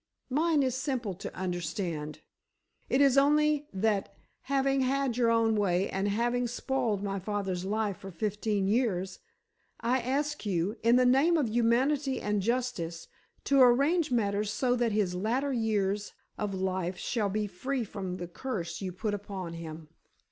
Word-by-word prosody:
"Mine 305 +1 +3
is 260 -2 0
simple 260 -6 -2
to 180 - -7
understand. 175 -4 -3 0.7
It 265 - +3
is 275 -1 +6
only 300 +1 +3
that 200 0 -1 0.3
having 275 0 +1
had 265 -1 +1
your 230 -2 +3
way 195 -3 +1
and 195 +1 -1
having 240 +4 +1
spoiled 235 -4 -1
my 195 -1 -2
father's 190 -2 -3
life 210 -1 -1
for 195 - -9
fifteen 210 +1 -1
years, 195 -5 0 0.6
I 245 +3 +1
ask 285 +4 -1
you, 195 0 0
in 235 +2 +4
the 250 0 +5
name 275 +7 +4
of 275 -7 +1
humanity 260 +5 +2
and 210 -1 0
justice, 215 -8 -2 0.3
to 275 -1 +4
arrange 280 +7 +4
matters 210 -3 0
so 250 +2 +1
that 240 -2 +1
his 205 -4 +1
latter 240 +9 0
years 210 -3 0 0.2
of 205 -2 -3
life 185 -1 -2
shall 215 -1 -1
be 210 +2 -1
free 250 +7 -3
from 190 -4 -5
the 175 -1 -5
curse 190 -2 -5
you 190 -2 -3
put 205 +4 -3
upon 195 -4 -5
him." 160 -2 -8
220 Hz, 155 wpm, -29 LUFS, 195-255 Hz, 0.7 s, is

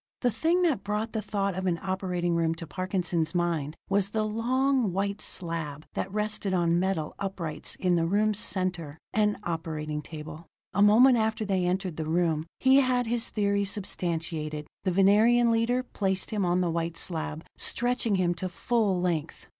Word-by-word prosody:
The 245 - +2
thing 330 - +1
that 280 - +1
brought 210 +2 -2
the 220 - -1
thought 200 -1 -1
of 185 +1 -3
an 170 -2 0
operating 185 -2 -1
room 165 -1 +1
to 165 - -7
Parkinson's 180 -1 -2
mind 165 -4 0
was 200 0 +1
the 215 +1 0
long, 250 +1 +1
white 200 +3 -2
slab 165 -4 -4
that 190 - -3
rested 210 -2 -1
on 170 -1 +2
metal 180 -5 -1
uprights 170 -6 -4
in 180 -2 +1
the 165 0 +1
room's 210 +2 +2
center 175 -7 -2 0.2
an 210 -1 +2
operating 155 -3 -3
table. 155 +1 -9 0.3
A 200 - +1
moment 235 +5 +7
after 220 0 0
they 190 -3 +1
entered 185 -2 -1
the 160 -1 -3
room, 165 -2 +1
he 265 +1 +5
had 255 -2 +3
his 235 +1 0
theory 200 -1 +1
substantiated: 165 -6 -2 0.2
the 185 - +2
Venerian 220 +6 +5
leader 235 +3 +1
placed 190 -6 -2
him 205 -3 0
on 175 +1 +2
the 175 -2 +1
white 165 0 -2
slab, 160 -2 -4
stretching 245 -3 0
him 180 -2 +2
to 185 +2 -4
full 200 0 0
length. 175 -4 -2
190 Hz, 170 wpm, -28 LUFS, 170-215 Hz, 0.3 s, moment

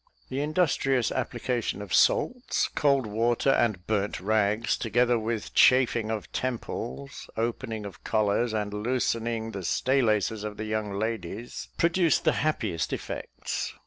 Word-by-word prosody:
The 135 +2 -2
industrious 145 -5 +1
application 120 -3 -2
of 100 -3 -6
salts, 250 0 +2
cold 140 -3 +2
water, 115 +5 +1
and 110 -9 +1
burnt 105 -2 -1
rags, 105 +2 +1
together 120 +1 +2
with 110 -4 -3
chafing 120 -4 +4
of 110 -2 -4
temples, 70 - -4
opening 115 -1 -2
of 95 -5 -10
collars, 110 +2 +1
and 105 -2 -2
loosening 115 0 -1
the 95 -3 -6
stay 130 +11 +2
laces 110 -2 +1
of 105 -1 -5
the 110 - -4
young 110 -1 -2
ladies, 110 +1 -4
produced 170 -2 +3
the - - +3
happiest 110 - -1
effects. - - -4
115 Hz, 135 wpm, -27 LUFS, 105-125 Hz, -, chafing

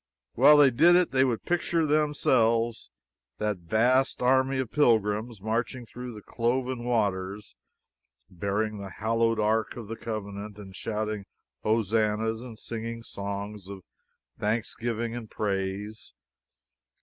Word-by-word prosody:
While 145 +5 +7
they 140 -3 +7
did 165 +9 +6
it 180 0 +3
they 130 0 +4
would 125 -4 0
picture 170 -1 +1
to - - +2
themselves 120 -6 +2 0.5
that 105 -2 -1
vast 120 +10 +2
army 130 +1 +3
of 130 -3 -2
pilgrims 110 -4 +2
marching 115 +4 -2
through 125 0 -8
the 105 - -10
cloven 125 +1 -1
waters, 105 -4 -1 0.7
bearing 100 +4 -2
the 100 -1 -6
hallowed 115 +3 0
ark 110 0 +1
of 115 -3 -7
the 115 - -5
covenant 105 -2 -6
and 95 -2 -11
shouting 110 -2 -3 0.4
hosannahs, 110 +1 +1
and 120 -3 -9
singing 115 +1 -5
songs 100 -1 -6
of 100 -2 -9 0.6
thanksgiving 115 +1 -2
and 115 -3 -7
praise. 100 +1 -3
110 Hz, 125 wpm, -27 LUFS, 105-125 Hz, 0.7 s, While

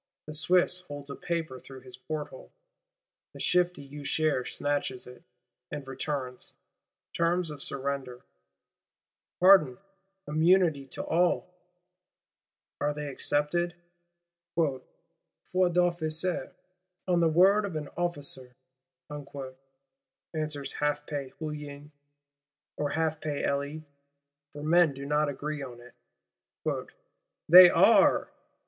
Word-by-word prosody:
The 155 - -7
Swiss 180 +3 +3
holds 145 -5 -8
a - - -5
paper 165 -7 -3
through 135 0 -12
his 125 -1 -8
porthole; 150 +3 -7 0.8
the - - -11
shifty 180 -5 +1
Usher 145 -2 0
snatches 145 -3 -2
it, 125 0 -13 0.5
and 140 -2 -7
returns. 135 -1 -5 0.6
Terms 170 0 +1
of 145 -2 -9
surrender: 135 -3 -4 1.1
Pardon, 180 -9 +6 0.5
immunity 160 -2 +3
to - - -5
all! 180 +1 +1 1.3
Are 145 0 0
they 150 -1 -4
accepted?—'Foi 175 +1 -3 0.7
d'officier, 175 -3 +1 0.6
On 175 -2 +3
the 170 - +4
word 190 +6 +5
of 195 -5 -4
an 150 -2 -4
officer,' 145 -7 -4 1.8
answers 155 -3 -3
half 150 0 -1
pay 145 -3 -4
Hulin,—or 145 -1 -9
half 160 0 -1
pay 150 -2 -3
Elie, 145 +2 -2 0.7
for 145 0 -9
men 160 -2 +4
do 140 +1 -7
not 150 +1 +1
agree 145 +2 -4
on 125 -3 -8
it, 125 0 -15 1.5
'they 180 +2 +11
are! - - +5
150 Hz, 100 wpm, -29 LUFS, 140-175 Hz, 1.8 s, they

